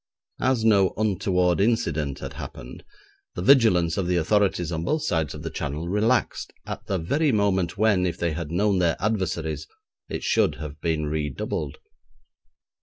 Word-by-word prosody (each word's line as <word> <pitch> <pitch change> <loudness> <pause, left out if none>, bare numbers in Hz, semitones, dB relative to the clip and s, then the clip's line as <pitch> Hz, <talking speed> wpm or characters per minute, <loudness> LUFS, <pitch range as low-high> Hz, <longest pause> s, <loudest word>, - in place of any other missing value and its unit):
As 130 -3 +1
no 100 -4 +4
'untoward 95 -4 +1
incident' 80 - 0
had - - -6
happened, - - -9 0.5
the 90 - -3
vigilance 90 - +4
of 95 -3 0
the 90 - +1
authorities 90 -1 +1
on 80 -1 -2
both 155 - 0
sides 80 -4 -1
of 75 - -9
the 80 - -4
Channel 75 +2 -4
relaxed 110 +5 +1
at - - -6
the 95 - 0
very 140 - +1
moment 95 -5 +1
when, 100 -4 +3
if 85 - -3
they 85 -1 0
had 80 -1 -4
known 95 +3 +1
their 85 -2 +2
adversaries, 85 -7 -2 0.4
it - - -4
should - - +2
have 75 -1 -8
been 80 -2 0
redoubled. 75 -1 -3
90 Hz, 160 wpm, -25 LUFS, 80-105 Hz, 0.5 s, no